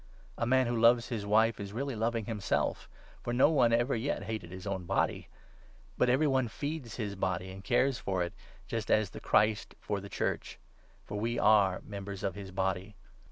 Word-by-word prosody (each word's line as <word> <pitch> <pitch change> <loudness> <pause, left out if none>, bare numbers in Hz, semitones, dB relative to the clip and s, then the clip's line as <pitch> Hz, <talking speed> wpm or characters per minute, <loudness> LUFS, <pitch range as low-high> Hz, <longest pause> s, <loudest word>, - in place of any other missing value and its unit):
A 115 - -1
man 130 +1 +4
who 120 0 -1
loves 120 0 +5
his 105 -4 -3
wife 110 +1 +3
is 100 0 -6
really 135 +2 -2
loving 115 0 -1
himself; 105 -3 -1 0.3
for 120 - -3
no 130 +5 +5
one 130 -6 +4
29 115 +1 +4
ever 125 +2 0
yet 115 -1 -2
hated 110 -4 -5
his 95 +2 -9
own 95 -3 -3
body. - - 0 0.7
But 125 - +2
every 130 +5 +3
one 130 -3 +2
feeds 140 0 -5
his 105 -4 -3
body 95 -1 -2
and 95 +1 -10
cares 125 +3 +2
for 95 -2 -1
it, 85 - -5 0.3
just 115 -2 -4
as 110 -3 +3
the - - -8
Christ 105 0 +2
for 100 - -2
the 100 +1 -9
Church; - - -2 0.5
for 105 - -4
we 115 +2 -1
are 100 -4 +5
30 - - -19
members 100 -1 -6
of 95 - 0
his 100 0 -8
Body. 95 +1 -2
110 Hz, 205 wpm, -31 LUFS, 100-120 Hz, 0.7 s, loves